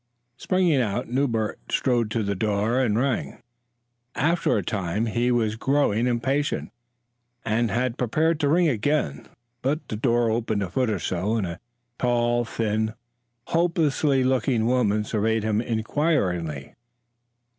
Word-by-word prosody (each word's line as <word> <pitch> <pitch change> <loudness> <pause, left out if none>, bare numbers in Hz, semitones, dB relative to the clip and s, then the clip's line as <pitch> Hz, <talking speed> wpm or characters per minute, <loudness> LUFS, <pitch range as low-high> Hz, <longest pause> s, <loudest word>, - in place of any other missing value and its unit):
Springing 175 -2 +2
out, 115 +2 -2
Newbert 120 -4 0
strode 120 -4 +1
to 115 0 -1
the 100 0 -1
door 105 +4 0
and 115 -5 +1
rang. 130 0 -1 0.8
After 165 -2 +1
a 100 - -1
time, 95 +3 -2
as 110 - -4
he 120 +1 +1
was 110 -3 +1
growing 125 -2 +1
impatient 130 +4 -1 0.7
and 115 +1 +1
had 125 +1 -1
prepared 155 +7 +1
to 145 - +1
ring 170 +3 +4
again, 125 - -1 0.3
the 135 +3 +1 0.2
door 120 0 +2
opened 110 -2 -1
a 90 - -5
foot 125 +4 +1
or 105 - 0
so, 95 +5 -1
and 110 -4 0
a 85 +1 -6 0.4
tall, 120 -1 +1
thin, 110 -1 -1 0.5
hopeless 165 -4 +1
looking 130 -4 +2
woman 110 -4 +2
surveyed 110 +1 0
him 110 0 +1
inquiringly. 110 - -1
120 Hz, 135 wpm, -24 LUFS, 105-130 Hz, 0.8 s, ring